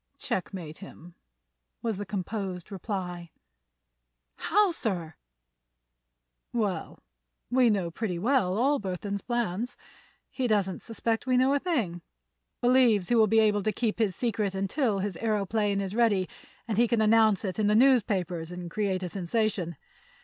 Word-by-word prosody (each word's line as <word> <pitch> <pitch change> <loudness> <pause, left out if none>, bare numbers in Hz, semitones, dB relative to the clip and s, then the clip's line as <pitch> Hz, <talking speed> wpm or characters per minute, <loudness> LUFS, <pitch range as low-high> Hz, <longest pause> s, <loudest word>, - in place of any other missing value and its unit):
"Checkmate 175 -4 -4
him," 175 -3 -12 0.7
was 225 -4 -1
the 205 0 -5
composed 195 -2 -4
reply. 180 -3 -5 1.1
"How, 415 -2 +3
sir?" 180 - -3 1.4
"Well, 210 -6 -2 0.5
we 250 -1 +5
know 190 -5 0
pretty 180 0 -3
well 200 -2 +1
all 280 +5 +2
Burthon's 200 +1 -4
plans. 240 -1 -2 0.5
He 260 -2 -1
doesn't 200 -4 0
suspect 225 +1 -2
we 255 -1 +3
know 260 +2 +4
a 285 - +2
thing; 230 - -1 0.6
believes 245 -6 +4
he 240 - +3
will 220 -2 +5
be 220 +2 +4
able 210 -1 +3
to 215 - 0
keep 220 +1 -2
his 205 -5 +1
secret 210 -5 -1
until 200 +3 0
his 195 -2 -3
aëroplane 210 -2 0
is 195 -1 -3
ready 210 -5 +2 0.4
and 220 -2 0
he 240 - +5
can 235 -1 +1
announce 220 -1 +4
it 190 +2 -3
in 210 - +2
the 210 - +3
newspapers 195 -10 +2
and 180 -1 -7
create 195 -3 -1
a 180 - -3
sensation. 190 -2 -1
210 Hz, 145 wpm, -28 LUFS, 185-230 Hz, 1.4 s, we